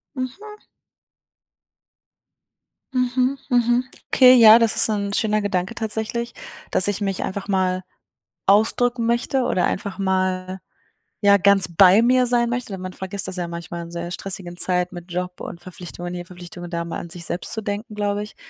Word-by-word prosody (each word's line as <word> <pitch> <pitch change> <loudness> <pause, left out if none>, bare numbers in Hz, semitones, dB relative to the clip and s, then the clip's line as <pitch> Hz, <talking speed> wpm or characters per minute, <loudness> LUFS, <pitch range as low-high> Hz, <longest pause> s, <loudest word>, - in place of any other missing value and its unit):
Mhm. 395 +12 -6 2.3
Mhm, 255 +1 0
mhm. 240 0 +2 0.3
Okay, 255 -1 +7
ja, 225 -2 +9
das 230 -2 +2
ist - - +7
'n 200 -2 -2
schöner 215 0 +1
Gedanke 195 +1 -2
tatsächlich, 225 +1 -3 0.4
dass 185 - +5
ich 205 0 -1
mich 195 -2 -2
einfach 195 +1 -4
mal 185 -2 0 0.7
ausdrücken 230 +4 +3
möchte 240 +3 0
oder 185 -7 +1
einfach 195 -1 -3
mal, 185 -1 -1 0.6
ja, 200 -1 +6
ganz 200 0 +4
bei 195 +4 +6
mir 250 +1 +3
sein 235 -1 +1
möchte, 240 -4 -4
denn 190 - -6
man 185 0 -6
vergisst 190 +1 -4
das 190 - -4
ja 175 - -3
manchmal 170 0 -7
in 170 - -11
sehr 170 0 -5
stressigen 185 -2 -6
Zeit 180 0 0
mit 175 0 -10
Job 180 0 -4
und 170 - -7
Verpflichtungen 175 0 -8
hier 175 0 -6
Verpflichtungen 175 -1 -10
da 170 -1 -3
mal 165 - -5
an 170 - -9
sich 170 0 -7
selbst 175 - -5
zu 220 - -3
denken, 210 +1 -5
glaube 205 0 -1
ich, 210 +1 -9
200 Hz, 170 wpm, -22 LUFS, 180-230 Hz, 2.3 s, ja